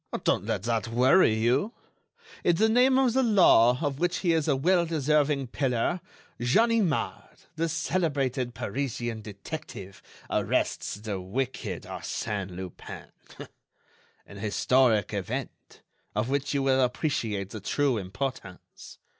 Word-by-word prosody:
"Don't - - +1
let 95 - -1
that 115 -2 -1
worry 125 +3 +4
you! 125 - +1 0.7
In 175 - +3
the 220 +6 +3
name 255 +3 +4
of 260 -3 +3
the 265 - +3
law, 175 - +5
of 140 -2 -2
which 175 +1 +1
he 175 -3 +2
is 160 -2 0
a 145 - +3
well 175 +6 +3
deserving 150 -3 +1
pillar, 130 +7 -1 0.4
Ganimard, 205 - +1
the 165 +1 -1
celebrated 140 -7 -1
Parisian 120 -1 -3
detective, 105 -1 -8 0.3
arrests - - -1
the 100 -2 -5
wicked 105 -2 -4
Arsène 105 -4 -4
Lupin. 90 0 -9 1.1
An 100 - -12
historic 110 +1 +2
event, - - -6 0.3
of 105 +4 0
which 140 0 -1
you 140 - +1
will 135 -1 +3
appreciate 115 - -1
the 110 - -6
true 135 +5 0
importance.... 100 0 -7
130 Hz, 125 wpm, -27 LUFS, 110-160 Hz, 1.1 s, law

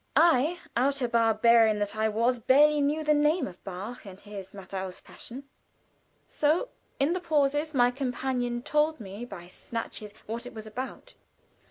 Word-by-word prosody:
I, 320 +1 +4 0.2
outer 265 +1 +2
barbarian 230 -1 +4
that 205 0 -2
I 220 0 +1
was, 235 +3 +1
barely 295 +5 +5
knew 295 +2 +1
the 300 0 +3
name 300 +1 +2
of 185 -2 -10
Bach 200 +6 -7
and 195 -2 -11
his 200 -2 -9
"Matthaus 190 -1 -6
Passion," 260 +4 -9 0.8
so 315 +11 +1 0.3
in 280 +5 +2
the 365 - -1
pauses 300 -2 +1
my 245 -1 +5
companion 250 -2 -2
told 300 +1 +1
me 205 +2 -7
by 175 -7 -10
snatches 215 +1 -6
what 230 +3 -5
it 245 - -11
was 220 0 -7
about. 250 +5 -7
245 Hz, 155 wpm, -28 LUFS, 215-290 Hz, 0.8 s, barely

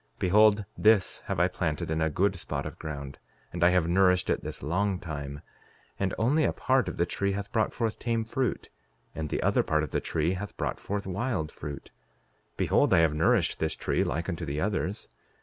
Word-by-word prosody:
Behold, 105 +2 +4
this 105 -3 +3
have - - -1
I 90 - +5
planted 80 -4 -2
in 80 0 0
a 80 - +2
good 95 +6 +1
spot 85 - -4
of - - -7
ground; 70 -3 -6 0.3
and 85 0 -1
I 85 - +7
have 90 -2 +2
nourished 90 +1 +3
it - - -1
this - - -6
long 95 +6 0
time, 70 -3 -6 0.6
and 95 -1 0
only 145 +8 +2
a - - +2
part 130 -1 +1
of - - -7
the 85 - +2
tree 100 +2 -1
hath 100 0 -5
brought 110 -2 +1
forth 115 -3 -2
tame 115 -1 0
fruit, 125 +1 -2 0.4
and 80 -2 -4
the - - -2
other - - +3
part 75 0 +1
of 75 - -5
the - - 0
tree 80 +3 0
hath 100 +2 -6
brought - - -2
forth 100 0 -3
wild 95 -4 -2
fruit; 75 -1 -8 0.7
behold, - - +3
I 80 - +6
have 75 - 0
nourished 75 - +2
this 80 -1 -1
tree - - 0
like 85 +2 -2
unto 85 -4 -3
the 70 +2 -3
others. 100 +2 -2
90 Hz, 205 wpm, -28 LUFS, 80-105 Hz, 0.7 s, I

